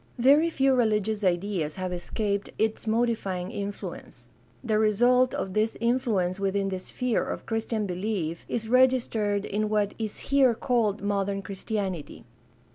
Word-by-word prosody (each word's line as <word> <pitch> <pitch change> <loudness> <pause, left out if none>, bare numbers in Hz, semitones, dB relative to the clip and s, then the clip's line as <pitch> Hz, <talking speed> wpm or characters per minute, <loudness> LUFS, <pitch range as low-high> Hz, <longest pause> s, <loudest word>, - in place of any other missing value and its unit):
Very 285 +7 +5
few 270 -4 +2
religious 215 -3 +1
ideas 175 -4 0
have 185 -1 -3
escaped 200 +3 -2
its 220 +1 -1
modifying 220 -5 0
influence. 200 -1 -7 0.3
The 215 -3 +1
result 245 +4 +3
of 190 - -3
this 215 +2 0
influence 225 -7 0
within 195 0 0
the 190 -1 -3
sphere 245 +5 -1
of - - -5
Christian 225 -1 -2
belief 180 -3 -3
is 225 -2 -2
registered 230 -5 +2
in 210 +1 -1
what 210 -1 +1
is 215 -2 -4
here 265 -4 +5
called 220 -4 0
modern 200 -1 -1
Christianity. 195 -4 -4
210 Hz, 135 wpm, -27 LUFS, 195-235 Hz, 0.3 s, Very